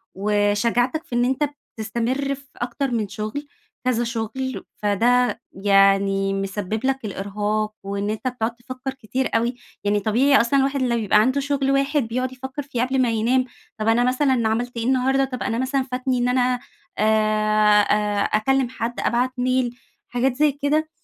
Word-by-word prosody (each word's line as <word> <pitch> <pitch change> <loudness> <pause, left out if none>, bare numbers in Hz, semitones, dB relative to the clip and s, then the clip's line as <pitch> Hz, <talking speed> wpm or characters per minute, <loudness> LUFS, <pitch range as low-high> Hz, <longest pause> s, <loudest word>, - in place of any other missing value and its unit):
وشجاعتك 210 +8 +1
في 240 - -6
إن 240 0 +3
أنت 270 +3 0 0.3
بتستمر 240 +6 -1
في 280 +1 -17
أكتر 245 +2 -2
من 220 -3 0
شُغل 215 +9 -5 0.4
كذا 240 -2 +1
شُغل، 235 +3 -3
فده 240 +5 +2
يعني 195 0 +3
مسبب 195 +4 -3
لك 265 -3 0
الإرهاق، 210 +2 -2
وإن 200 +1 -3
أنت 220 +4 -3
بتقعد 235 -2 -2
تفكّر 255 +2 -6
كتير 265 +1 -3
أوي، 235 +2 +1 0.3
يعني 205 0 +2
طبيعي 245 +7 +4
أصلًا 270 +4 +2
الواحد 275 0 +1
لو 240 -2 +1
بيبقى 210 -2 +3
عنده 260 +4 +1
شُغل 275 -1 0
واحد 275 +1 +2
بيقعد 255 +2 -2
يفكر 265 +3 -6
فيه 270 -4 -3
قبل 260 +1 +1
ما 245 - +2
ينام، 245 +4 +2 0.3
طب 215 +1 -2
أنا 235 +2 +4
مثلًا 255 -2 +2
عملت 240 +2 -2
إيه 230 - -2
النهارده، 265 +1 +2
طب 255 -2 -5
أنا 225 - -1
مثلًا 265 +1 0
فاتني 255 0 0
إن 245 0 +1
أنا 250 0 +2 0.4
آآ 215 -1 +3
آآ 205 -1 +1
أكلم 255 +4 +1
حد 240 -1 -4
أبعت 245 +2 +1
ميل، 250 -1 0 0.3
حاجات 250 +1 0
زي 295 +1 +3
كده 295 +3 0
245 Hz, 165 wpm, -22 LUFS, 215-265 Hz, 0.4 s, طبيعي